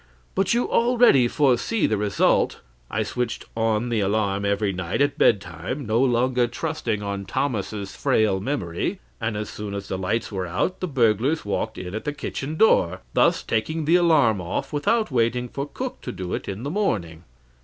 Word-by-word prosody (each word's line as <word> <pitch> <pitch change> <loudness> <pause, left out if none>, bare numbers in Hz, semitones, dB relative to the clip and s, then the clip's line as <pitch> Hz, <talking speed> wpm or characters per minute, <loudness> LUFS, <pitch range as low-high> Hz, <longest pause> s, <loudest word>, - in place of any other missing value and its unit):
But 195 +4 +1
you 240 - +1
already 235 - +4
foresee 145 - +2
the 110 - +1
result. 105 -1 +1 0.3
I 110 +1 0
switched 115 +3 -3
on 115 +1 0
the 115 -2 0
alarm 100 0 0
every 100 0 +1
night 90 -1 -3
at 145 0 +2
bed 105 - +5
time, 95 - -6
no 110 +2 +2
longer 125 -1 +2
trusting 120 -7 -3
on 100 -1 -4
Thomas's 105 -4 -3
frail 105 -3 +2
memory; 95 -7 -2 0.2
and 110 -1 -1
as 105 0 -3
soon 105 -1 -6
as 100 -1 -6
the 95 - -2
lights 105 +6 -1
were 95 -3 -3
out 90 - -1
the 185 - -2
burglars 130 - +1
walked 110 +2 -2
in 90 0 -6
at 110 - -5
the 150 - -1
kitchen 150 0 -4
door, 90 - +3
thus - - +3
taking 155 +8 -1
the 165 +3 +4
alarm 150 - +4
off 85 +10 -4
without 215 +9 +1
waiting 125 0 +1
for 140 +3 -4
the 145 - -18
cook 260 -1 -5
to 125 - -5
do 90 -5 -5
it - - -4
in 100 +4 -5
the 140 - -3
morning. 95 - -1
115 Hz, 185 wpm, -24 LUFS, 100-145 Hz, 0.3 s, bed